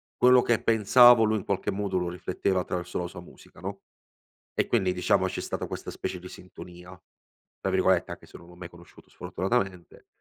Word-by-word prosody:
quello 125 0 +5
che 115 -2 +1
pensavo 115 +2 +6
lui 110 0 +1
in 100 - -7
qualche 100 +1 -2
modo 100 -1 -2
lo 90 -1 -1
rifletteva 90 +1 -2
attraverso 90 0 -4
la 90 - -3
sua 90 - -10
musica, 85 - -17
no; - - -7 0.7
e - - 0
quindi 95 -6 +1
diciamo 90 -1 +1
c'è - - -4
stata - - -4
questa - - -7
specie 90 - -5
di 90 - -11
"sintonia", 90 0 -13 0.6
tra 95 - -2
virgolette, 95 -1 +2
anche - - -11
se - - -14
non 85 - -16
l'ho 90 - -15
mai 90 -1 -9
conosciuto 85 0 -18
sfortunatamente. 95 -3 -3
95 Hz, 190 wpm, -27 LUFS, 90-105 Hz, 0.7 s, pensavo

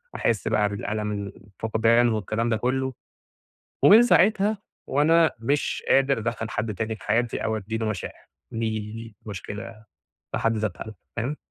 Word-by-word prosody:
أحس 115 -3 0
بقى 105 -1 +2
بالألم 105 +1 -3
الفقدان 110 +4 +1
والكلام 110 +2 -1
ده 110 - +1
كله، 130 +2 -1 0.9
ومن 220 +4 +9
ساعتها 210 -1 +4 0.3
وأنا 160 +4 +4
مش 140 +6 -1
قادر 135 -1 +4
أدخّل 110 -1 -3
حد 110 0 -2
تاني 110 +2 -2
في - - -15
حياتي، 115 +2 +1
أو 110 0 0
أدّي 110 +2 -4
له 110 - -2
مشاعر، 105 -4 -5 0.3
دي 110 -1 -1
دي 110 +1 -8
مشكلة 105 +2 -7 0.5
في - - -1
حد 115 -1 +1
ذاتها 110 +1 -4 0.2
فاهم؟ 130 +6 -2
110 Hz, 145 wpm, -25 LUFS, 105-125 Hz, 0.9 s, ومن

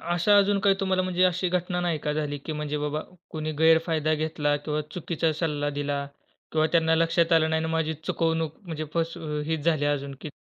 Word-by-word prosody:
अशा 175 +5 +3
अजून 200 0 +3
काही 195 0 +4
तुम्हाला 190 -1 +1
म्हणजे 185 0 0
अशी 180 0 +1
घटना 180 0 -1
नाही 170 -3 0
का 150 0 -2
झाली, 150 -1 -2
की 155 +3 -6
म्हणजे 150 -1 -3
बाबा 150 +1 -2 0.3
कोणी 155 0 -3
गैरफायदा 160 -1 +3
घेतला? 155 -1 0
किंवा 150 +1 -3
चुकीचा 165 -2 -1
सल्ला 145 -3 -1
दिला? 145 -1 -1 0.5
किंवा 155 0 +3
त्यांना 165 -1 +4
लक्षात 165 +1 +2
आलं 160 -1 +4
नाही 160 0 +1
आणि 160 0 -2
माझी 160 -1 0
चुकवणूक 160 -2 -1
म्हणजे 155 -2 -4
फस 165 0 -1
अ, 150 -2 -3
हीच 160 -1 -1
झाली 155 -3 +2
अजून 140 -1 -1
की 155 - -6
160 Hz, 200 wpm, -26 LUFS, 150-170 Hz, 0.5 s, काही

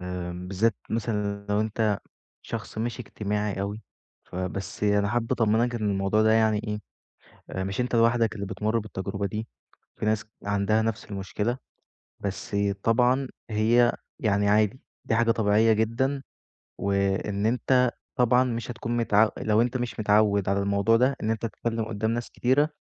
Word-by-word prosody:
امم، 90 0 -5
بالذات 100 +2 +1
مثلًا 105 -3 -2
لو 105 +1 +2
أنت 110 -1 0 0.4
شخص - - -6
مش 115 +2 -2
إجتماعي 105 -2 -2
أوي، 100 +2 -4 0.4
ف - - -13
بس 95 +3 -4
أنا 105 0 +3
حابب 120 -1 -1
أطمنك 115 +2 +2
إن 105 -3 0
الموضوع 100 +2 +1
ده 110 0 +4
يعني 110 -1 +3
إيه، 105 -1 -3 0.7
آآ، 95 - -3
مش 100 +5 -3
أنت 125 0 -1
لوحدك 115 -1 +3
اللي 100 -2 -4
بتمُر 110 +4 -1
بالتجربة 100 -1 -4
دي، 110 +4 -4 0.5
في - - -3
ناس 110 -1 +1 0.2
عندها 100 +2 +2
نفس 110 -1 -2
المشكلة، 105 +5 -3 0.6
بس 100 0 -4 0.3
طبعًا 125 +3 +3 0.2
هي 115 +3 +4 0.3
يعني 100 -2 +2
عادي، 105 +4 +3 0.2
دي - - 0
حاجة 115 0 +3
طبيعية 110 0 +3
جدًا 125 +6 0 0.6
وإن 100 +1 0
أنت 125 +1 +3 0.2
طبعًا 125 +1 +4
مش 120 -1 -3
هتكون 120 0 -3
متعو 110 -2 +4
لو 110 +1 +2
أنت 125 +2 0
مش 120 -2 -4
متعود 105 -2 +3
على 100 0 +2
الموضوع 100 +3 +3
ده، 130 +3 +3
إن 110 - +1
أنت 110 - -2
تتكلم 115 0 -2
قدّام 110 0 -1
ناس 120 +1 -3
كتيرة، 145 +5 +2
110 Hz, 160 wpm, -26 LUFS, 100-115 Hz, 0.7 s, ده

